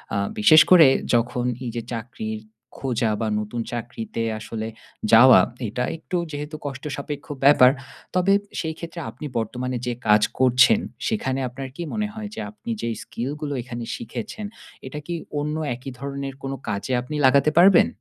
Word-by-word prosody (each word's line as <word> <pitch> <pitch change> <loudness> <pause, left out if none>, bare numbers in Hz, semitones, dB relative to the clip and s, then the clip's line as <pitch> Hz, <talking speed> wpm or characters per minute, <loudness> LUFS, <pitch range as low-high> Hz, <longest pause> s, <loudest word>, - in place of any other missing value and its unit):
আ - - +1 0.2
বিশেষ 155 +9 +8
করে 165 -6 +9 0.3
যখন 120 +1 +1 0.2
এই 120 - -3
যে 120 - -2
চাকরির 110 -2 -5 0.4
খোঁজা 120 -4 0
বা 110 - 0
নতুন 105 +3 -4
চাকরিতে 115 -1 -5 0.2
আসলে 110 0 -5 0.4
যাওয়া, 120 +3 +9 0.3
এটা 125 +4 -2
একটু 180 +3 -4
যেহেতু 150 +2 -5
কষ্টসাপেক্ষ 140 +1 -5 0.2
ব্যাপার। 135 -2 +7 0.4
তবে 185 +2 +4 0.3
সেই 160 -1 -2
ক্ষেত্রে 170 0 -7
আপনি - - -9
বর্তমানে 125 +2 -2
যে 120 - 0
কাজ 105 0 +6 0.2
করছেন, 130 - +5 0.3
সেখানে 135 -12 -1
আপনার 130 +2 -7
কী 170 - -5
মনে 215 -1 -1
হয় 215 -2 -6
যে - - -6
আপনি 230 +2 -7
যে 115 - -2
স্কিলগুলো 145 +4 -4
এখানে 120 -1 -6
শিখেছেন, 120 - -6 0.4
এটা 150 +3 -6
কি 175 - -4 0.3
অন্য 150 +1 -2 0.2
একই 130 +2 -8
ধরনের 140 -1 -5
কোনো 135 0 -3
কাজে 105 +4 -3
আপনি 150 +5 -6
লাগাতে 140 +3 +5
পারবেন? 185 0 +7
130 Hz, 155 wpm, -23 LUFS, 120-155 Hz, 0.4 s, করে